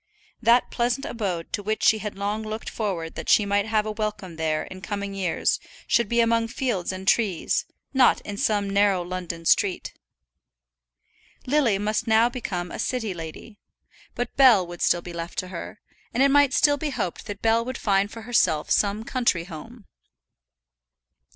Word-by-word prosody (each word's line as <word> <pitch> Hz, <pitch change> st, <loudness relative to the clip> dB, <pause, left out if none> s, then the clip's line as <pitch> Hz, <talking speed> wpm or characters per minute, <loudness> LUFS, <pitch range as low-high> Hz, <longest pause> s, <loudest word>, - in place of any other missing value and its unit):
That 235 Hz, +1 st, +4 dB
pleasant 245 Hz, +3 st, 0 dB
abode 185 Hz, -7 st, -4 dB
to -, -, -1 dB
which 215 Hz, +2 st, -2 dB
she 220 Hz, -, +5 dB
had 210 Hz, -2 st, -6 dB
long 205 Hz, +2 st, -2 dB
looked 220 Hz, 0 st, -5 dB
forward 180 Hz, -7 st, -3 dB
that -, -, -6 dB
she 210 Hz, -, +5 dB
might 200 Hz, +1 st, +1 dB
have 215 Hz, -1 st, +1 dB
a 215 Hz, -, -2 dB
welcome 210 Hz, -5 st, -4 dB
there 155 Hz, -1 st, -1 dB
in 185 Hz, 0 st, -10 dB
coming 200 Hz, 0 st, -4 dB
years 185 Hz, -4 st, 0 dB, 0.3 s
should 235 Hz, -3 st, +2 dB
be 235 Hz, 0 st, +3 dB
among 230 Hz, 0 st, +2 dB
fields 230 Hz, -7 st, -2 dB
and 185 Hz, 0 st, -7 dB
trees, 200 Hz, -8 st, +1 dB, 0.3 s
not 260 Hz, -2 st, +5 dB
in 205 Hz, -, -6 dB
some 205 Hz, -1 st, +1 dB
narrow 200 Hz, -2 st, +2 dB
London 175 Hz, -2 st, -6 dB
street. 190 Hz, +2 st, +2 dB, 1.5 s
Lily 255 Hz, -7 st, +2 dB
must 215 Hz, +3 st, -1 dB
now 225 Hz, +2 st, +4 dB
become 180 Hz, -8 st, -4 dB
a -, -, -6 dB
city 225 Hz, -6 st, -2 dB
lady; 170 Hz, +6 st, -9 dB, 0.6 s
but 245 Hz, -, -4 dB
Bell 245 Hz, -9 st, +6 dB
would 175 Hz, 0 st, -9 dB
still 175 Hz, -1 st, +2 dB
be 175 Hz, -, -8 dB
left 170 Hz, 0 st, -6 dB
to 185 Hz, -, -3 dB
her, 185 Hz, +3 st, -7 dB, 0.4 s
and 260 Hz, -, +4 dB
it 275 Hz, -, +4 dB
might 285 Hz, -1 st, +4 dB
still 290 Hz, -1 st, +4 dB
be 300 Hz, +1 st, -2 dB
hoped 185 Hz, -10 st, -4 dB
that 205 Hz, -1 st, -7 dB
Bell 225 Hz, +1 st, +3 dB
would 255 Hz, +2 st, -5 dB
find 200 Hz, -1 st, +1 dB
for 225 Hz, +1 st, -9 dB
herself 185 Hz, -10 st, +1 dB
some 205 Hz, +1 st, +2 dB
country 235 Hz, -9 st, 0 dB
home. 200 Hz, +7 st, -11 dB
210 Hz, 175 wpm, -25 LUFS, 185-230 Hz, 1.5 s, Bell